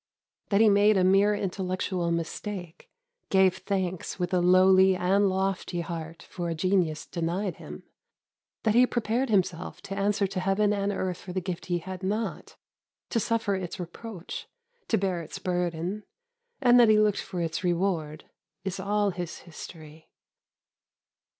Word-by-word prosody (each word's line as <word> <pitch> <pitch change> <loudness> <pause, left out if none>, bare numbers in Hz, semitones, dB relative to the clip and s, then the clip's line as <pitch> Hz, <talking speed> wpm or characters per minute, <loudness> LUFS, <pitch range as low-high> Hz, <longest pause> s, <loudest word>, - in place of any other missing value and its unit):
That 200 +1 +3
he 225 - +7
made 205 0 +5
a 185 - +3
mere 195 +3 +4
intellectual 185 -2 -2
mistake, 170 +1 -4 0.4
gave 190 -1 +4
thanks 185 -3 -2
with 180 -1 -2
a 180 - +4
lowly 185 +1 +6
and 195 +3 +2
lofty 190 -2 -1
heart 165 -1 -6
for 175 -2 -5
a 165 - -2
genius 175 -2 +1
denied 175 +3 -2
him, - - -10 0.8
that 220 - +3
he 250 +2 +6
prepared 240 +2 0
himself 180 -4 0
to 195 - -5
answer 200 +1 +1
to 190 -1 -3
Heaven 195 +3 +2
and 200 0 0
earth 185 -2 -2
for 180 - -8
the 190 - 0
gift 180 -1 -5
he 175 -1 +1
had 185 +2 -7
not, 210 +4 -3 0.6
to 230 - +2
suffer 225 -2 0
its 190 0 -4
reproach, 180 +2 -7 0.4
to 225 - +2
bear 185 -3 -1
its 160 - -8
burden, 180 +2 -2 0.6
and 245 -2 +6
that 235 -2 +7
he 215 - +6
looked 210 -1 +3
for 185 -2 -6
its 165 +1 -2
reward, 170 -4 -1 0.4
is 190 0 -3
all 205 +1 +1
his 175 -1 -6
history. 160 -2 -11
190 Hz, 155 wpm, -27 LUFS, 175-205 Hz, 0.8 s, he